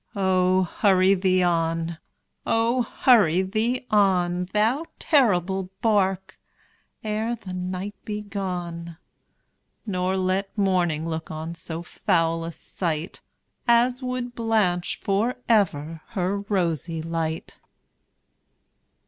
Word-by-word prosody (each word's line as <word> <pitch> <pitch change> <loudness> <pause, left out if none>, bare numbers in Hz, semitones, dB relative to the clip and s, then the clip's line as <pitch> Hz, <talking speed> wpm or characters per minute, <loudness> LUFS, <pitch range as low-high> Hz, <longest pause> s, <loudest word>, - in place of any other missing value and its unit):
Oh! 185 -1 +3
hurry 190 +1 +3
thee 185 -1 +2
on 165 -1 0 0.4
oh! 230 +2 +2 0.2
hurry 190 -8 +5
thee 225 +6 -1
on, 180 -4 +3
Thou 230 +9 +1
terrible 190 - +2
bark, 190 -3 +1 0.6
ere 220 +2 -1
the 195 -5 -9
night 185 +2 -4
be 210 -1 -4
gone, 175 -5 -5 0.9
Nor 185 -2 -1
let 190 +2 -1
morning 175 -5 +1
look 160 0 -4
on 160 +1 -5
so 165 0 -6
foul 165 -1 0
a 165 - -4
sight 165 0 -4 0.5
As 245 +2 +4
would 250 -1 -3
blanch 215 -7 0
for 210 +5 +1
ever 165 - +1
her 195 0 0
rosy 165 -4 -1
light! 165 -1 -3
185 Hz, 105 wpm, -24 LUFS, 170-210 Hz, 0.9 s, hurry